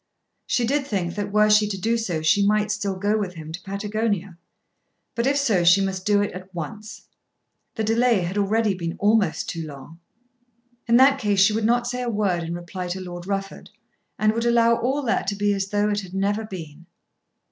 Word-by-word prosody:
She 240 - +1
did 280 +3 0
think 180 -7 -2
that 205 0 -4
were 210 +1 +4
she 210 0 +5
to 195 - -3
do 225 +4 +1
so 180 -9 -2
she 180 +6 +3
might 210 +1 +2
still 205 -2 -2
go 205 +3 0
with 185 -3 -4
him 160 -1 -8
to 170 +2 -7
Patagonia. 200 -2 -3 0.7
But, 235 +2 -1
if 280 +1 +2
so, 225 -11 +2
she 175 +3 +6
must 190 -1 -2
do 205 -1 +3
it 205 - -3
at 185 +1 -10
once. 210 +7 -7 0.7
The 220 - -2
delay 225 -1 +2
had 175 +2 -3
already 210 +1 +1
been 170 -2 -4
almost 205 -4 +1
too 165 - -4
long. 145 +3 -11 0.9
In 235 0 +5
that 270 +1 +5
case 205 -5 +1
she 195 +2 +5
would 220 0 -1
not 240 +1 +2
say 250 +1 -3
a 245 - -2
word 200 -6 0
in 165 +1 -4
reply 180 +1 -6
to 180 +2 -4
Lord 175 -1 -8
Rufford, 195 -1 -4 0.5
and 215 0 +2
would 230 +1 -1
allow 235 0 +4
all 270 +5 -1
that 230 - 0
to 200 - 0
be 205 0 +1
as 195 -1 -2
though 205 +1 0
it 205 - 0
had 185 -1 -10
never 205 +3 0
been. 170 -4 -9
205 Hz, 210 wpm, -23 LUFS, 185-220 Hz, 0.9 s, she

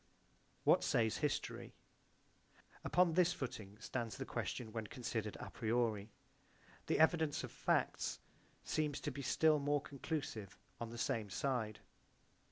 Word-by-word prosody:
What - - +5
says 110 -2 +2
history? 150 -2 -2 1.1
Upon 180 -2 +4
this 175 0 +4
footing 105 - -5
stands 115 -1 -3
the - - -3
question 110 -3 -3
when 110 -1 -3
considered 115 -3 -3
a - - -6
priori: 110 -2 0 0.8
the - - +3
evidence 160 -2 +4
of - - -5
facts - - +1 0.5
seems 150 -2 0
to 150 - -2
be 140 +1 -5
still 155 +3 +4
more 145 +1 +2
conclusive 140 - -4 0.2
on 115 - -3
the 120 - -7
same 115 -4 0
side. 110 +1 -1
125 Hz, 130 wpm, -38 LUFS, 110-150 Hz, 1.1 s, What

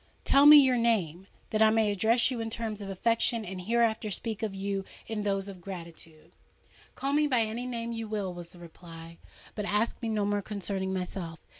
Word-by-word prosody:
—tell 280 +1 +6
me 300 0 +11
your 260 -3 +5
name!—that 210 -2 -1
I 220 - +7
may 220 -1 +2
address 225 +6 +2
you 245 - -3
in 225 - -3
terms 220 -2 -4
of 200 - -6
affection, 230 +3 0
and 185 0 -6
hereafter 225 +1 +1
speak 215 +3 -3
of 215 -3 -3
you 195 0 -3 0.2
in 220 -2 -4
those 195 -1 -1
of 190 -3 -9
gratitude." 170 -4 -10 0.6
"Call 275 +1 -2
me 300 0 +3
by 250 -5 +2
any 225 +3 -3
name 235 -1 -4
you 225 -1 -5
will," 205 -4 -3
was 175 -1 -8
the 175 - -16
reply; 165 -1 -12 0.3
"but 210 - -4
ask 210 +4 0
me 230 - -2
no 210 -2 0
more 205 0 0
concerning 195 -2 -4
myself. 180 -3 -5
210 Hz, 195 wpm, -29 LUFS, 190-230 Hz, 0.6 s, me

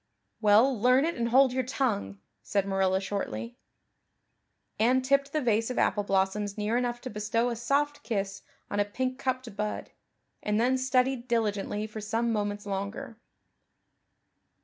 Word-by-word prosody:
"Well, 215 +3 +4
learn 255 +4 +5
it 335 - 0
and 235 -4 -1
hold 260 +1 +5
your 260 - +1
tongue," 235 - -1 0.2
said 200 -2 0
Marilla 190 -1 +1
shortly. 120 - -4 1.2
Anne 255 +4 +3
tipped 275 +1 +2
the 305 - 0
vase 225 -1 +2
of 255 - -4
apple 205 - +2
blossoms 200 +1 0
near 210 +2 0
enough 240 -1 -1
to 255 - -6
bestow 215 +3 0
a 235 - -2
soft 290 +5 0
kiss 200 -5 -3 0.3
on 205 - -1
a - - +5
pink 255 +5 -3
cupped 255 -5 -3
bud, 210 0 -3 0.5
and 210 0 0
then 250 +3 +3
studied 255 -1 +1
diligently 210 -3 -1
for 215 0 -7
some 225 +2 0
moments 205 -1 -2
longer. 205 +5 -5
225 Hz, 150 wpm, -28 LUFS, 205-255 Hz, 1.2 s, learn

